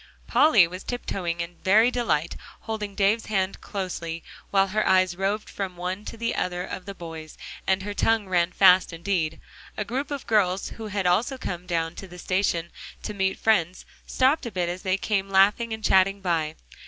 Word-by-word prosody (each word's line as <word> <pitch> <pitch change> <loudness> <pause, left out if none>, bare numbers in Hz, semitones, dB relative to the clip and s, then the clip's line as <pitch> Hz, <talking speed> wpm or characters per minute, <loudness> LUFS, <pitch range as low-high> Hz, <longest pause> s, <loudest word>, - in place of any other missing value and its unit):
Polly 230 - +5
was 185 +3 -8
tiptoeing 180 -8 -3
in 170 +1 -6
very 215 +5 +5
delight, 200 -11 0 0.3
holding 210 -2 -5
Davie's 210 +3 +2
hand 195 -2 -1
closely 170 -4 -5 0.3
while 195 -1 +3
her 215 +2 +1
eyes 185 -1 +3
roved 200 +3 -1
from 190 -3 -5
one 185 +4 -4
to - - -7
the 230 +1 -1
other 180 0 -2
of 185 0 -7
the 200 - -6
boys, 165 -3 -9 0.3
and 190 0 +2
her 205 +1 -4
tongue 220 0 +1
ran 175 -1 +2
fast 185 -1 +5
indeed. 165 -2 -1 0.4
A 210 - -2
group 265 +6 -3
of 285 -3 -5
girls, 195 -4 +1
who 225 -1 -8
had 200 -2 -2
also 215 +10 +2
come 180 -7 -5
down 165 -1 -1
to 195 - -7
the 180 0 -12
station 175 -2 -1 0.3
to 210 - -4
meet 190 -1 0
friends, 185 -5 +1 0.2
stopped 265 +1 +2
a - - -5
bit 180 -2 -1
as 180 +1 -5
they 185 0 0
came 195 -1 -1
laughing 200 +4 +3
and 220 0 -5
chatting 195 0 +4
by. 165 -5 -1
190 Hz, 190 wpm, -25 LUFS, 175-210 Hz, 0.4 s, Polly